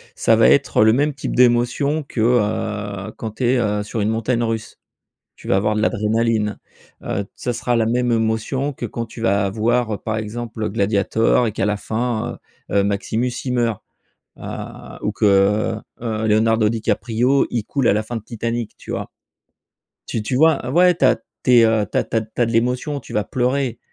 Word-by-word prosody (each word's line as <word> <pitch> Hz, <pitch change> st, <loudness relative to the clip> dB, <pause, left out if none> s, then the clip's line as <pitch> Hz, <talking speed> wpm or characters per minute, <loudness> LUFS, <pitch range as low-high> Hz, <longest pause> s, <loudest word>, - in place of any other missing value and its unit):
Ça -, -, +3 dB
va -, -, +5 dB
être -, -, +4 dB
le 110 Hz, -, +6 dB
même 145 Hz, +4 st, +1 dB
type 135 Hz, -, -4 dB
d'émotion 125 Hz, +5 st, +2 dB
que, 135 Hz, -, -7 dB
heu, 105 Hz, -3 st, 0 dB
quand 110 Hz, -2 st, -6 dB
tu 130 Hz, -, -1 dB
es, 125 Hz, +2 st, +3 dB
heu, 105 Hz, -3 st, 0 dB
sur 105 Hz, +1 st, -4 dB
une 105 Hz, -, +1 dB
montagne 115 Hz, +2 st, 0 dB
russe. 115 Hz, -1 st, -4 dB, 0.6 s
Tu -, -, -12 dB
vas -, -, +3 dB
avoir 105 Hz, +2 st, +1 dB
de 105 Hz, -, 0 dB
l'adrénaline, 110 Hz, -1 st, 0 dB, 0.4 s
heu, 100 Hz, +2 st, -2 dB
ça 125 Hz, -, -3 dB
sera 120 Hz, +1 st, -1 dB
la 115 Hz, -1 st, +2 dB
même 120 Hz, +1 st, +1 dB
émotion 115 Hz, +5 st, 0 dB
que 125 Hz, -, -5 dB
quand 115 Hz, +1 st, -4 dB
tu 115 Hz, -, -11 dB
vas 100 Hz, -3 st, +1 dB
voir, 110 Hz, +1 st, 0 dB
par 110 Hz, -1 st, -2 dB
exemple, 110 Hz, 0 st, -4 dB
Gladiator 105 Hz, +3 st, +2 dB
et 110 Hz, -, -2 dB
qu'à 100 Hz, -, -1 dB
la 105 Hz, 0 st, 0 dB
fin, 110 Hz, +2 st, -3 dB, 0.3 s
heu, 100 Hz, -1 st, +2 dB
Maximus 110 Hz, +5 st, -1 dB
il 130 Hz, -, -2 dB
meurt, 115 Hz, -4 st, 0 dB, 0.6 s
heu, -, -, -11 dB, 0.6 s
ou -, -, -1 dB
que, -, -, -1 dB
heu, 100 Hz, +3 st, +3 dB, 0.2 s
heu, 110 Hz, -2 st, -2 dB
Leonardo 110 Hz, 0 st, +3 dB
Di 115 Hz, 0 st, -3 dB
Caprio 120 Hz, +6 st, +1 dB
il 115 Hz, -3 st, -1 dB
coule 135 Hz, -4 st, 0 dB
à -, -, +5 dB
la 105 Hz, +1 st, 0 dB
fin 115 Hz, +2 st, -5 dB
de -, -, -7 dB
Titanic, 115 Hz, 0 st, -4 dB
tu -, -, -9 dB
vois? -, -, -4 dB, 0.9 s
Tu 115 Hz, -, -3 dB
tu 110 Hz, +4 st, -2 dB
vois? 155 Hz, -2 st, +3 dB
Ouais 180 Hz, +3 st, +5 dB
tu -, -, +2 dB
as -, -, +5 dB, 0.3 s
tu 125 Hz, -, +2 dB
es -, -, +6 dB, 0.2 s
tu -, -, -3 dB
as -, -, +3 dB
tu -, -, -6 dB
as 110 Hz, -, +3 dB
tu 110 Hz, -, -10 dB
as -, -, +5 dB
de 115 Hz, -, -3 dB
l'émotion, 125 Hz, +5 st, 0 dB
tu -, -, -12 dB
vas 105 Hz, -, +1 dB
pleurer. 125 Hz, 0 st, -1 dB
115 Hz, 200 wpm, -20 LUFS, 105-120 Hz, 0.9 s, le